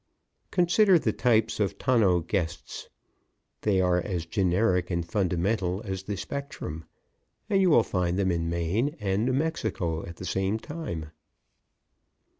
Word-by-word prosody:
Consider 180 +2 +4
the - - 0
types 115 -3 +2
of 100 -3 0
tonneau 105 -9 +3
guests. 85 -1 -4 0.7
They 100 -3 +2
are 90 -1 +2
as 85 -3 -3
generic 90 0 +1
and 85 -2 -1
fundamental 95 +1 0
as 95 -2 -3
the 100 +1 -4
spectrum 105 - -6 0.7
and 195 -1 +4
you 185 - +4
will 120 -8 +6
find 90 -3 -1
them 95 -2 +2
in 85 -1 -1
Maine 90 - 0
and 105 +2 0
New 130 - +1
Mexico 125 - -1
at 85 - -8
the 90 - -8
same 95 +3 0
time. 110 - -6
95 Hz, 140 wpm, -27 LUFS, 90-115 Hz, 0.7 s, will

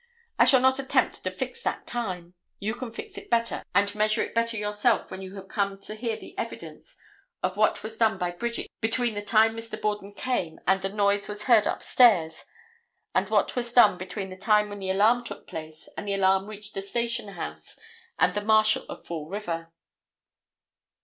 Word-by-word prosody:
I - - +7
shall 260 -2 +6
not 260 +1 +4
attempt 265 - +1
to - - 0
fix 470 - -6
that - - -3
time; 185 -7 -4 0.2
you 210 +2 -2
can 240 0 -6
fix 405 - -8
it 410 - -17
better 230 0 +1
and 200 +1 +3
measure 215 0 +2
it - - -7
better 230 0 0
yourself 210 +3 0
when 190 - -6
you 190 +1 -8
come 195 0 -2
to 210 - -4
hear 225 +1 -3
the - - -12
evidence - - -7 0.5
of 185 - 0
what 215 0 +2
was 220 +1 -4
done 220 -1 +3
by 180 -1 -2
Bridget 235 +6 -4
between 235 +1 +1
the 205 - -3
time 220 +1 +3
Mr. 225 -1 -6
Borden 210 -1 -2
came 215 -11 -2
and 190 0 +3
the 195 - -2
noise 200 0 +2
was 210 0 -1
heard 230 -4 +5
upstairs 180 -11 +3 0.7
and - - +1
what - - +1
was 240 -1 0
done 240 -7 +6
between 190 +1 -5
the 185 - -8
time 210 +1 +3
when 205 0 -7
the 190 -1 -4
alarm 215 +6 +3
took - - -6
place 155 -1 -9
and 205 - -6
the 200 - 0
alarm 190 0 +2
reached 210 -1 -7
the 195 - -3
station 230 0 -2
house 75 - -7 0.4
and - - +3
the 205 - -1
Marshal 215 0 +4
of - - -9
Fall 160 -2 -6
River. 170 -5 -4
210 Hz, 195 wpm, -26 LUFS, 195-230 Hz, 0.7 s, I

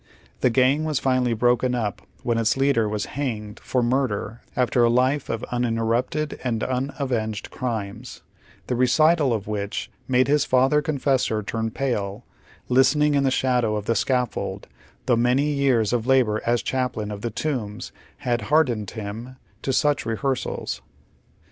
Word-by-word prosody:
The 125 - +3
gang 130 +5 +3
was 155 -3 0
finally 130 -3 +1
broken 125 +2 +2
up 110 -4 -2 0.2
when 115 -1 +1
its 115 +3 +1
leader 135 -6 +2
was 105 -1 -2
hanged 110 -7 -4
for 125 -2 -1
murder 120 -3 -1
after 125 -1 +2
a 120 - +5
life 130 +4 +1
of 115 - -2
unuiterrupted 120 +5 -1
and 115 -3 -1
unavenged 125 -4 -2
crimes, 110 -6 -5 0.4
the 125 - -1
recital 145 +4 +4
of 110 -3 -1
which 105 -1 -4 0.2
made 130 0 +3
his 145 0 +3
father 130 +3 +3
confessor 135 -7 0
turn 110 +2 -2
pale, 110 -4 -3 0.4
listening 145 +4 +4
in 140 -1 +2
the 135 - +3
shadow 125 -4 +1
of 105 -1 -3
the 115 - +2
scaffold, 125 0 -1 0.4
though 125 - +3
many 130 +5 +2
yeai 135 -4 +3
s 110 +1 -1
of 120 -1 0
labor 125 -5 +3
as 120 0 +2
chaplain 125 -5 -2
of 100 -1 -6
the 120 - -2
Tombs 115 -4 -3 0.3
liad 120 -3 0
hardened 125 -10 +2
him 110 +4 -7 0.3
to 135 - -1
such 145 +2 +2
rehearsals. 130 +4 -2
125 Hz, 155 wpm, -24 LUFS, 110-135 Hz, 0.4 s, a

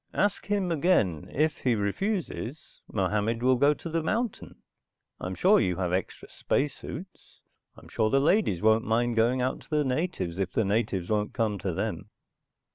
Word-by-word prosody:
"Ask 205 -1 0
him 200 -3 0
again. 140 - +1
If 155 +2 0
he 125 -3 +1
refuses, 155 - -3
Mohammed 105 +4 0
will 130 0 +5
go 145 +3 +4
to - - -8
the 165 0 -1
mountain. 220 +7 -2 0.6
I'm 95 +1 -4
sure 200 - +5
you 90 - +1
have 90 -1 -2
extra 95 0 -3
space 140 0 -1
suits. 180 +5 -10 0.4
I'm - - -14
sure 110 -1 0
the 135 - +3
ladies 140 - +2
won't 110 +1 +4
mind 120 +1 +1
going 120 +3 +2
out 130 - -1
to - - -19
the 150 -2 +2
natives 130 - -2
if 95 -1 -2
the 110 - +1
natives 100 -3 -1
won't 105 -1 0
come 110 -4 0
to - - -2
them." - - -3
120 Hz, 175 wpm, -27 LUFS, 105-160 Hz, 0.6 s, will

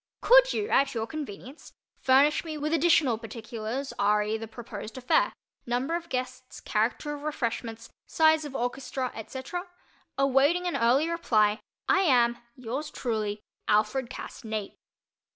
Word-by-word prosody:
Could - - +7
you 420 -1 -1
at 275 -1 +3
your 225 -1 -1
convenience 275 0 -8 0.3
furnish 275 +3 +4
me 315 -2 -5
with 300 +2 -2
additional 305 -7 +3
particulars 230 +3 -5
re 210 +1 +2
the 225 0 -5
proposed 220 0 -8
affair—number 260 - -1
of 340 0 -5
guests, 255 0 -5
character 230 +7 -1
of 290 - -7
refreshments, 230 -6 -3 0.2
size 315 -1 +4
of 290 -2 -7
orchestra, 255 +1 -2
etc.? 265 - -6 0.5
Awaiting 275 +6 +3
an 350 - -1
early 250 +7 +3
reply, 220 -11 +2 0.3
I 395 - +4
am, 245 -9 +3 0.2
Yours 255 +5 -4
truly, 215 -4 -3 0.3
ALFRED 215 +4 +2
CASS 260 - -8
NAPE. 215 -2 -4
255 Hz, 135 wpm, -28 LUFS, 225-300 Hz, 0.5 s, Could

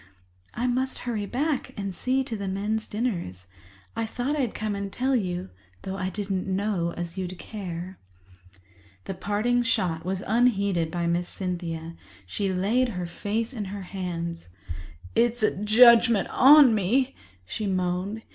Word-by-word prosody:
"I 240 - -1
must 255 +1 0
hurry 215 -4 -2
back 285 +4 -1
and 195 -2 -3
see 260 +6 0
to 240 -3 -5
the 200 -2 -4
men's 210 +3 -2
dinners. 170 - -3 0.5
I 225 - -1
thought 250 +6 -2
I'd 260 -7 -1
come 215 -1 -2
and 200 0 -4
tell 260 +4 +1
you, 180 - -2 0.3
though 190 - -4
I 185 -1 -2
didn't 195 -1 -3
know 190 -3 0
as 175 +1 -4
you'd 185 -1 -4
care." 185 -2 -7 1.1
This 195 - -5
parting 215 +5 +1
shot 185 -9 0
was 185 +1 -3
unheeded 200 -7 +2
by 170 +1 -2
Miss 175 +1 0
Cynthia. 170 -3 -4 0.3
She 195 - -2
laid 215 +8 +1
her 180 -5 -4
face 215 +7 -3
in 215 -5 -4
her 195 0 -6
hands. 170 - -5 0.7
"It's 235 0 +2
a 215 - +3
judgement 230 +1 +6
on 275 -2 +8
me," 240 +7 +1 0.3
she 205 - -3
moaned. 185 +3 -1
200 Hz, 150 wpm, -26 LUFS, 180-235 Hz, 1.1 s, on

